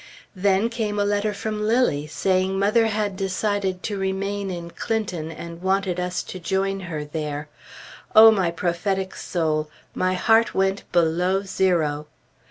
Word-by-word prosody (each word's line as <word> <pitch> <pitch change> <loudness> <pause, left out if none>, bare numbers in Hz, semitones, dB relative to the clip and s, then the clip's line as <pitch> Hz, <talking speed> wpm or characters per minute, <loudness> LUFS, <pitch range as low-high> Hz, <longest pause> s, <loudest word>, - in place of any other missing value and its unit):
Then 195 +3 +2
came 220 -3 -2
a 205 - +2
letter 205 +1 +1
from 210 +1 -4
Lilly, 210 - +1
saying 185 +4 0
mother 215 +3 +3
had 210 -2 -1
decided 195 0 -1
to 205 -3 -3
remain 195 +1 -2
in 170 -2 -6
Clinton, 185 -9 -3
and 170 +1 -9
wanted 190 -1 0
us 180 0 -2
to 185 - -8
join 195 +2 -1
her 165 -5 -5
there. 150 -1 -4 0.7
O 220 +1 +10
my 190 -5 +1
prophetic 185 +3 -2
soul! 155 -3 -1 0.2
My 185 0 0
heart 225 +5 +3
went 195 +1 0
below 180 +3 +2
zero! 165 -6 0
190 Hz, 145 wpm, -23 LUFS, 170-205 Hz, 0.7 s, O